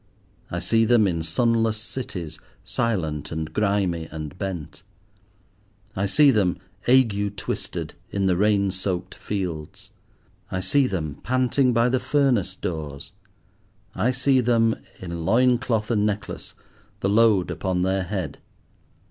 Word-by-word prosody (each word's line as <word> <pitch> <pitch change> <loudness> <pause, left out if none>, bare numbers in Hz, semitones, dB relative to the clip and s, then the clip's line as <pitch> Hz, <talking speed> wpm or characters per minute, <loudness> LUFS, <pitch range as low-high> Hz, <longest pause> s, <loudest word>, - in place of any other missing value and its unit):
I 85 - -3
see 115 +6 +2
them 115 -1 +4
in 85 -4 0
sunless 115 +6 +1
cities, 100 - -6 0.2
silent, 85 - -2
and 80 0 -4
grimy, 100 -5 0
and 75 +1 -6
bent. 90 -6 -5 1.1
I 100 +1 0
see 145 +8 +5
them, 95 -7 +2 0.3
ague 105 -6 +3
twisted, 95 - -4 0.2
in 100 -1 -1
the 95 -2 +3
rain 100 0 +2
soaked 95 -1 -3
fields. 90 -7 -5 0.6
I 95 - -2
see 130 +9 +2
them, 80 - -3
panting 130 +1 +2
by 115 0 +3
the 130 +1 +2
furnace 125 -12 +1
doors. 75 -6 -5 0.8
I 120 - +1
see 130 +1 +2
them, 115 -2 +3 0.2
in 85 -2 -5
loin 120 +6 +4
cloth 115 -4 -1
and 105 -3 +2
necklace, 105 0 -3 0.5
the 95 - +1
load 105 -3 +4
upon 90 -2 -1
their 95 +1 +1
head. 90 -5 -4
100 Hz, 130 wpm, -24 LUFS, 90-115 Hz, 1.1 s, see